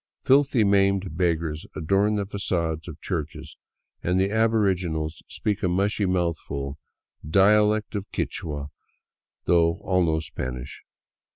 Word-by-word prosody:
Filthy, 135 -3 +4
maimed 100 -3 +2
beggars 85 -3 -1
adorn 100 +6 +2
the 100 -1 -1
fagades 85 -5 -2
of 80 -2 -8
churches, 80 -5 -5 0.5
and 90 +2 +1
the 95 +1 +1
aboriginals 95 -8 +1
speak 105 -2 -2
a - - +1
mushy, 100 +3 +1
mouthful, 80 -6 -2 0.4
dialect 105 +6 +3
of 100 -2 -4
Ouichua, 75 -3 -3 0.7
though 85 -1 +3
all 90 -1 +2
know 80 -1 +1
Spanish. 65 -4 -6
90 Hz, 115 wpm, -25 LUFS, 80-100 Hz, 0.7 s, Filthy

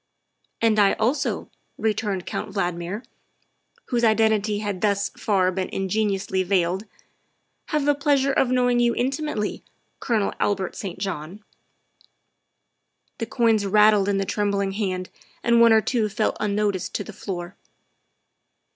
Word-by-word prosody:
" - - -46
And 220 -2 +4
I 200 -1 +5
also," 255 +6 -1 0.3
returned 210 -4 -1
Count 215 - -4
Valdmir, 175 +3 -2 0.9
whose 240 -2 0
iden 220 0 +4
tity 210 0 -2
had 205 -3 -3
thus 200 -1 +1
far 190 -3 +1
been 185 0 -3
ingeniously 195 -1 -1
veiled, 185 +1 0 0.4
" - - -48
have 300 -3 0
the 290 - +4
pleasure 280 -1 +2
of 265 - +2
knowing 245 -1 +2
you 240 -1 +2
intimately, 265 -4 -2 0.4
Colonel 220 -5 0
Albert 195 -3 -1
St. 190 -4 -6
John." 190 +1 -5 1.8
The 230 - -3
coins 230 -3 +2
rattled 210 0 +5
in 200 - +1
the 195 - 0
trembling 200 -1 0
hand 185 -3 -3 0.3
and 235 0 +4
one 230 -1 +7
or 220 0 +6
two 220 -1 0
fell 215 +2 0
unnoticed 205 -2 -1
to - - -1
the 215 - -10
floor. 175 -2 -6
210 Hz, 140 wpm, -24 LUFS, 195-230 Hz, 1.8 s, one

